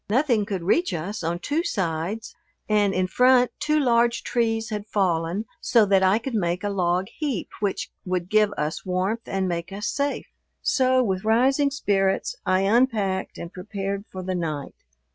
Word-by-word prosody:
Nothing 235 Hz, -3 st, +2 dB
could 195 Hz, -5 st, -3 dB
reach 335 Hz, -, +2 dB
us 180 Hz, +5 st, -4 dB
on 170 Hz, +1 st, -1 dB
two 290 Hz, -, -1 dB
sides, 190 Hz, -, -2 dB, 0.3 s
and 210 Hz, -2 st, +3 dB
in 185 Hz, -1 st, +1 dB
front 250 Hz, +5 st, +4 dB
two 305 Hz, 0 st, +2 dB
large 235 Hz, -3 st, +2 dB
trees 225 Hz, -2 st, 0 dB
had 210 Hz, 0 st, -4 dB
fallen 185 Hz, 0 st, 0 dB, 0.2 s
so 230 Hz, -3 st, +4 dB
that 195 Hz, -1 st, +3 dB
I 190 Hz, +2 st, +4 dB
could 240 Hz, +3 st, -5 dB
make 180 Hz, -3 st, -1 dB
a 205 Hz, -, 0 dB
log 180 Hz, -1 st, +1 dB
heap 280 Hz, -, -2 dB
which 200 Hz, -2 st, -2 dB
would 180 Hz, -1 st, -2 dB
give 215 Hz, +1 st, +3 dB
us 150 Hz, +1 st, -2 dB
warmth 190 Hz, +5 st, -2 dB
and 195 Hz, -1 st, -1 dB
make 170 Hz, +1 st, -3 dB
us 205 Hz, +2 st, -5 dB
safe. 280 Hz, 0 st, -1 dB, 0.4 s
So 255 Hz, -1 st, +3 dB
with 190 Hz, -4 st, -1 dB
rising 260 Hz, +6 st, +3 dB
spirits 195 Hz, -8 st, 0 dB
I 185 Hz, +1 st, +3 dB
unpacked 205 Hz, -3 st, +1 dB
and 170 Hz, +2 st, -8 dB
prepared 195 Hz, +1 st, -4 dB
for 185 Hz, -1 st, -6 dB
the 185 Hz, +1 st, -2 dB
night. 155 Hz, -5 st, -3 dB
200 Hz, 170 wpm, -24 LUFS, 185-235 Hz, 0.4 s, front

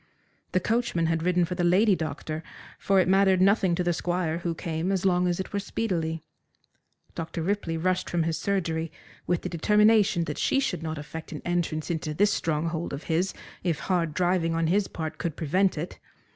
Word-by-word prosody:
The 185 Hz, -, +4 dB
coachman 220 Hz, -4 st, 0 dB
had 165 Hz, 0 st, +1 dB
ridden 180 Hz, 0 st, +2 dB
for 180 Hz, -, -4 dB
the 180 Hz, 0 st, -1 dB
lady 190 Hz, +4 st, +4 dB
doctor, 155 Hz, -1 st, -4 dB, 0.4 s
for 195 Hz, -1 st, +3 dB
it 185 Hz, -, +3 dB
mattered 190 Hz, 0 st, +4 dB
nothing 190 Hz, -2 st, +4 dB
to 180 Hz, -, 0 dB
the 175 Hz, 0 st, +1 dB
Squire 175 Hz, -1 st, -1 dB
who 170 Hz, -1 st, -2 dB
came 165 Hz, +3 st, -2 dB
as 195 Hz, -1 st, 0 dB
long 180 Hz, -1 st, +3 dB
as 175 Hz, 0 st, 0 dB
it 190 Hz, -, -5 dB
were 200 Hz, -, 0 dB
speedily. 165 Hz, -7 st, -2 dB, 0.9 s
Dr. 165 Hz, 0 st, -4 dB
Ripley 180 Hz, -3 st, -1 dB
rushed 185 Hz, +2 st, 0 dB
from 170 Hz, -1 st, +1 dB
his 165 Hz, 0 st, 0 dB
surgery 165 Hz, -5 st, -1 dB, 0.4 s
with 175 Hz, -1 st, 0 dB
the -, -, -2 dB
determination 210 Hz, +2 st, +4 dB
that -, -, -4 dB
she 270 Hz, -, +2 dB
should 200 Hz, -, -1 dB
not 160 Hz, -1 st, -4 dB
effect 150 Hz, +2 st, -8 dB
an 150 Hz, -, -7 dB
entrance 175 Hz, -2 st, -1 dB
into 155 Hz, -2 st, -3 dB
this 205 Hz, +4 st, +3 dB
stronghold 165 Hz, +1 st, -1 dB
of 140 Hz, -, -5 dB
his 170 Hz, +4 st, 0 dB, 0.3 s
if 170 Hz, -4 st, 0 dB
hard 170 Hz, -5 st, 0 dB
driving 175 Hz, -2 st, +1 dB
on 165 Hz, 0 st, +1 dB
his 190 Hz, +5 st, +2 dB
part 160 Hz, -1 st, -5 dB
could 165 Hz, -4 st, -2 dB
prevent 180 Hz, +4 st, +1 dB
it. 165 Hz, +4 st, -5 dB
175 Hz, 195 wpm, -27 LUFS, 160-190 Hz, 0.9 s, The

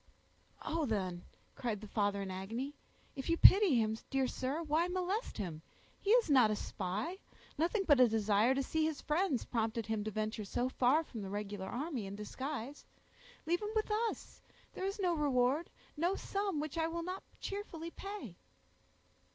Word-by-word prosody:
"Oh! 320 Hz, -2 st, -1 dB
then," 185 Hz, -5 st, -2 dB, 0.3 s
cried 230 Hz, -5 st, -2 dB
the 215 Hz, -, -9 dB
father 200 Hz, -1 st, 0 dB
in 190 Hz, -, -5 dB
agony, 225 Hz, +10 st, -4 dB, 0.4 s
"if 270 Hz, +2 st, -5 dB
you 335 Hz, -, +3 dB
pity 390 Hz, -6 st, +8 dB
him, 220 Hz, -2 st, +2 dB
dear 270 Hz, -1 st, +2 dB
sir, 270 Hz, +6 st, -2 dB
why 320 Hz, +3 st, +2 dB
molest 370 Hz, +5 st, -2 dB
him? 170 Hz, -7 st, -4 dB, 0.4 s
He 400 Hz, -, -4 dB
is 475 Hz, +2 st, +6 dB
not 260 Hz, -7 st, +6 dB
a 215 Hz, -, +1 dB
spy; 205 Hz, -, -3 dB, 0.4 s
nothing 350 Hz, +7 st, +1 dB
but 290 Hz, -7 st, +5 dB
a 250 Hz, -, +8 dB
desire 220 Hz, +2 st, +3 dB
to 275 Hz, -, +1 dB
see 315 Hz, +4 st, 0 dB
his 315 Hz, -2 st, 0 dB
friends 300 Hz, -4 st, +1 dB
prompted 225 Hz, -1 st, -1 dB
him 220 Hz, -2 st, -1 dB
to 215 Hz, -, -2 dB
venture 215 Hz, +1 st, -2 dB
so 245 Hz, +5 st, -1 dB
far 260 Hz, +5 st, +3 dB
from 235 Hz, -8 st, -8 dB
the 195 Hz, -, -5 dB
regular 205 Hz, -1 st, -4 dB
army 255 Hz, -, -3 dB
in 195 Hz, -, -6 dB
disguise. 265 Hz, +5 st, -5 dB, 0.6 s
Leave 345 Hz, +4 st, +1 dB
him 420 Hz, -, -2 dB
with 430 Hz, 0 st, +1 dB, 0.2 s
us; -, -, -10 dB, 0.3 s
there 375 Hz, -, -3 dB
is 390 Hz, +1 st, -2 dB
no 360 Hz, -3 st, +2 dB
reward, 285 Hz, 0 st, +2 dB, 0.3 s
no 345 Hz, +5 st, +1 dB
sum, 395 Hz, -6 st, -2 dB
which 310 Hz, +2 st, -3 dB
I 320 Hz, -, +2 dB
will 335 Hz, +1 st, -3 dB
not 370 Hz, +2 st, -4 dB, 0.2 s
cheerfully 335 Hz, -5 st, -5 dB
pay." 335 Hz, -, -7 dB
270 Hz, 175 wpm, -35 LUFS, 215-335 Hz, 0.6 s, pity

